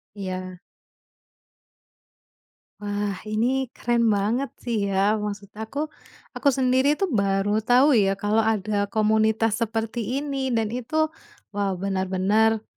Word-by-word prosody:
Iya. 185 -2 -5 2.2
Wah, 205 -1 -2
ini 245 +5 0
keren 235 -1 +1
banget 225 +7 0
sih 220 -4 -1
ya 200 +2 +2
maksud 205 -1 -5
aku, 220 +6 -6 0.6
aku 285 - +1
sendiri 260 +2 +3
itu 385 +4 -1
baru 200 -2 +1
tahu 245 +6 +4
ya 195 -1 +3
kalau 205 +2 0
ada 215 -2 +1
komunitas 220 +1 +2
seperti 225 0 -2 0.2
ini 270 -3 -2
dan 220 -2 0
itu 250 +4 -6 0.6
wow 200 -2 -1
bener-bener, 195 +3 +1
215 Hz, 115 wpm, -24 LUFS, 200-235 Hz, 2.2 s, tahu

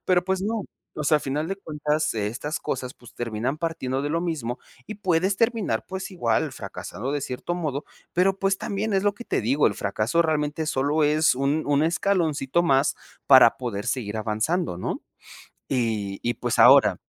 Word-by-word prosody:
pero, 180 -1 +3
pues 190 0 0
no, 215 +1 -2 0.3
o 150 - -4
sea, 155 0 +4
a - - -13
final 150 +5 -2
de 195 - -3
cuentas 150 -4 -1
estas 115 +8 -3
cosas, 125 -1 -4
pues, 120 - -16
terminan 120 +4 -3
partiendo 155 -6 -2
de 145 - -2
lo 165 +3 -1
mismo 140 -9 -3 0.3
y - - -6
puedes 190 -1 +1
terminar, 230 -1 0
pues, 190 +1 -5
igual, 120 -12 0
fracasado 125 +7 -6
de 145 - -1
cierto 135 +6 -4
modo, 150 -5 -3 0.3
pero, 190 +2 +2
pues, 195 0 +1
también 205 +1 -2
es 195 - +2
lo 205 - +2
que 220 +4 -11
te - - 0
digo, 135 +6 +3
el 100 - +1
fracaso 110 +12 0
realmente 155 -1 -1
solo 150 +1 +1
es 155 0 +3
un 140 +4 0
un 145 0 +2
escaloncito 165 -3 +1
más 135 -5 +2 0.3
para 130 -4 +7
poder 120 -4 -4
seguir 115 -4 -2
avanzando, 110 - -1
¿no? - - -4 0.7
Y 110 -6 -1
y 120 - +1
pues - - -2
ahora - - +7
150 Hz, 180 wpm, -25 LUFS, 125-175 Hz, 0.7 s, para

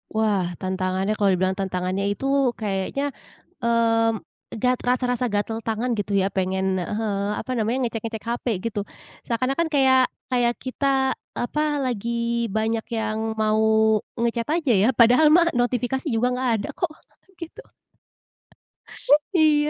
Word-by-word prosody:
Wah, 215 -3 +2 0.2
tantangannya 185 +1 -1
kalau 200 -2 +2
dibilang 185 +1 +1
tantangannya 190 0 -2
itu, 205 - -4 0.3
kayaknya, 215 +7 -2 0.4
mmm, 230 -2 +2 0.4
gat 250 0 +2
rasa-rasa 250 0 +1
gatel 210 +2 -1
tangan 225 +3 -1
gitu, 205 0 -3
ya. 195 0 +2
Pengen, 190 0 -1
ah 180 +3 -3
hah, 200 -2 -1
apa - - -9
namanya 225 +3 0
ngecek-ngecek 225 -2 -4
HP 240 +2 -3 0.2
gitu, 205 - -3 0.5
seakan-akan 260 +7 0
kayak 260 -2 +5 0.2
kayak 240 -1 +2
kita, 260 +2 -3 0.5
eee, - - -3
apa, 300 +5 -1 0.2
lagi 235 0 -1
banyak 220 +1 0
yang 215 0 -2 0.2
mau 220 0 +3 0.2
nge-chat 235 0 0 0.2
aja, 275 -6 +2
ya. 215 - +4
Padahal 245 +6 +6
mah 340 -1 +5
notifikasi 250 +3 -1
juga 235 +2 +2
nggak 255 0 0
ada - - -5
kok, - - -1 0.5
gitu. 335 - -8 1.8
Iya 300 -2 +4
225 Hz, 135 wpm, -23 LUFS, 205-250 Hz, 1.8 s, Padahal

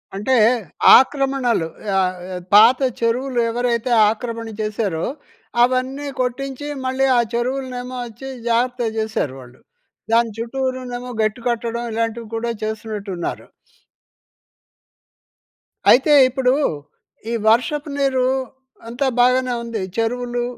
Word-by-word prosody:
అంటే, 210 +7 +1 0.6
ఆక్రమణలు 265 - +1 0.3
ఆహ్, 185 -1 0 0.4
పాత 225 +5 +7 0.2
చెరువులు 245 +2 0
ఎవరైతే 240 0 -1 0.2
ఆక్రమణ 230 +1 -4
చేశారో, 210 -6 -2 0.6
అవన్నీ 260 +3 0
కొట్టించి 270 +3 -3 0.2
మళ్ళీ 260 +1 +1
ఆ - - +5
చెరువులనేమోచ్చి 250 -1 -4 0.2
జాగ్రత్తగా 240 0 0
చేసారు 220 -11 -2
వాళ్ళు. 125 0 -15 0.5
దాని 230 -1 +3
చుట్టూరా‌నేమో 250 0 -4
గట్టు 215 +3 -1
కట్టడం, 235 0 -2
ఇలాంటివి 230 0 -2
కూడా 235 +1 -2
చేస్తున్నట్టు 215 -2 -5
ఉన్నారు. 170 - -4 2.5
అయితే 270 +4 +5 0.2
ఇప్పుడు, 255 0 +1 0.8
ఈ - - -1
వర్షపు 285 +7 +2
నీరు, 265 -2 +1 0.6
అంతా 245 +4 -1
బాగానే 250 +1 +3
ఉంది. 230 -3 -4 0.2
చెరువులు, 240 +1 -1
245 Hz, 95 wpm, -20 LUFS, 225-255 Hz, 2.5 s, పాత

